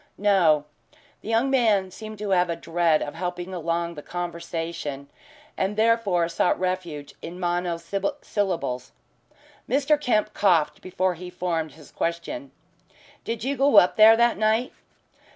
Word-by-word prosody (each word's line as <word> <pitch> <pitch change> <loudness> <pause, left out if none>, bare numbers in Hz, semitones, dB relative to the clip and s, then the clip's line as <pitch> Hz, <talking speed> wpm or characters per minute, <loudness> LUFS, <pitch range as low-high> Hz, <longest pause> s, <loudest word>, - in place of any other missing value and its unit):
"No." 175 -8 +3 0.6
The - - -8
young 230 +4 +2
man 215 -8 +2
seemed 215 +2 -9
to 205 -1 -4
have 180 -1 +3
a 170 - -1
dread 165 -1 +1
of 145 - -6
helping 180 +1 -5
along 170 0 -2
the 150 - -8
conversation, 165 -4 -5 0.4
and 195 +2 -1
therefore 215 -6 +2
sought 170 +1 +1
refuge 180 -6 -3
in 175 +2 -8
monosyllables. 175 - -2 0.8
Mr. 285 +4 +2
Kemp 215 -6 +1
coughed 175 -7 +2
before 185 0 -1
he 180 +1 -9
formed 165 -4 -3
his 155 -1 -16
question. 220 - -3 0.7
"Did 230 -1 -4
you 275 +2 -1
go 275 -3 +4
up 180 - +6
there 220 +1 +8
that 235 -2 +3
night?" 220 +3 +1
180 Hz, 135 wpm, -25 LUFS, 170-215 Hz, 0.8 s, there